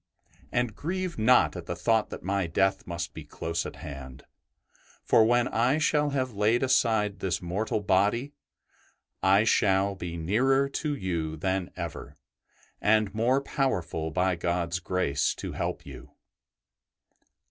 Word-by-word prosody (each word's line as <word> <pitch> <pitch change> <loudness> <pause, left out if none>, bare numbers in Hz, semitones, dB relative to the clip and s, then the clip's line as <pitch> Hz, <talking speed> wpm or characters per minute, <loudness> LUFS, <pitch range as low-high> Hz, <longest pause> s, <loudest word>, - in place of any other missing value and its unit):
And 120 -3 0
grieve 180 0 -3
not 125 +1 +4
at 90 - -7
the 85 - -3
thought 110 +5 +1
that - - -8
my 95 -1 0
death 95 +3 0
must 85 -1 -4
be 80 - -8
close 80 +3 -4
at - - -9
hand, 70 -1 -9 0.8
for 110 - +5
when 120 +2 +3
I 120 +6 +2
shall 150 -1 +2
have 130 -3 -2
laid 110 +5 +2
aside 110 -6 +2
this 95 -2 -1
mortal 100 +5 -2
body 105 +8 +1 0.9
I 95 +2 +5
shall 100 -3 +2
be 85 -3 -6
nearer 130 +11 +2
to 145 +1 -2
you 85 - -3
than 95 +2 -1
ever, 85 -4 -7 0.6
and 110 -1 +3
more 120 +5 +2
powerful 90 - -1
by 90 +3 +1
God's 85 0 -1
grace 85 -6 0
to - - -6
help - - -4
you." - - -11
100 Hz, 140 wpm, -27 LUFS, 85-120 Hz, 0.9 s, for